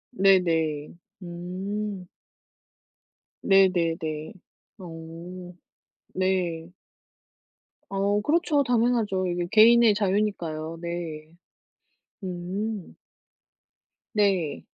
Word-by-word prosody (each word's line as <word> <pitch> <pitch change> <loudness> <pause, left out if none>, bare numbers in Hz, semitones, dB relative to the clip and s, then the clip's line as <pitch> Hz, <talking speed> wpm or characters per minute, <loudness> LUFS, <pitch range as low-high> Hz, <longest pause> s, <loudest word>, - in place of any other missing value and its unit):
네네. 165 -7 +2 0.3
음. 185 +3 -5 1.3
네네 185 -4 +4
네. 155 0 -5 0.4
어. 175 +1 -9 0.6
네. 180 -3 -1 1.2
어 200 +1 +1
그렇죠. 305 +1 +2
당연하죠. 230 -6 +1
이게 175 0 -2
개인의 230 0 +7
자유니까요. 185 -6 -1
네. 165 -2 -5 0.9
음. 190 +3 -4 1.2
네. 190 -8 +1
185 Hz, 120 characters per minute, -26 LUFS, 165-205 Hz, 1.3 s, 개인의